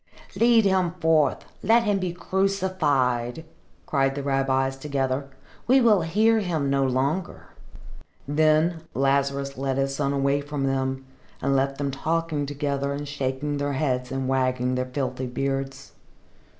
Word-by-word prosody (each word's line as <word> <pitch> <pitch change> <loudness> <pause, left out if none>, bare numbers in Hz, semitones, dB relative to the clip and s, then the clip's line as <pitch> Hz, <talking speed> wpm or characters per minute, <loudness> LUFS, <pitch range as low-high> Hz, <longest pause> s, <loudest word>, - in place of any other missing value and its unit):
"Lead 230 -2 +4
him 185 -3 +2
forth! 160 -3 +2 0.2
Let 230 +1 +4
him 205 -3 +1
be 185 -2 -2
crucified!" 160 -9 0 0.4
cried 135 -2 +1
the 140 - -4
rabbis 135 -1 +1
together. 135 -1 -2 0.4
"We 260 +3 +6
will 220 -6 +4
hear 215 +7 +3
him 160 -8 -1
no 140 0 +2
longer." 140 +8 -2 0.8
Then 155 +3 +2
Lazarus 140 0 0
led 135 -1 -1
his 135 0 0
son 140 -1 0
away 140 0 +1
from 145 -1 -4
them, 135 0 -1 0.3
and 140 +1 0
left 135 0 0
them 140 -1 -2
talking 155 +1 -1
together 140 -1 -2
and 145 +1 -5
shaking 140 +1 -2
their 145 0 -1
heads 130 -3 -1
and 135 -1 -2
wagging 130 -1 0
their 130 0 -1
filthy 130 -1 -3
beards. 135 +1 -3
140 Hz, 140 wpm, -25 LUFS, 135-160 Hz, 0.8 s, We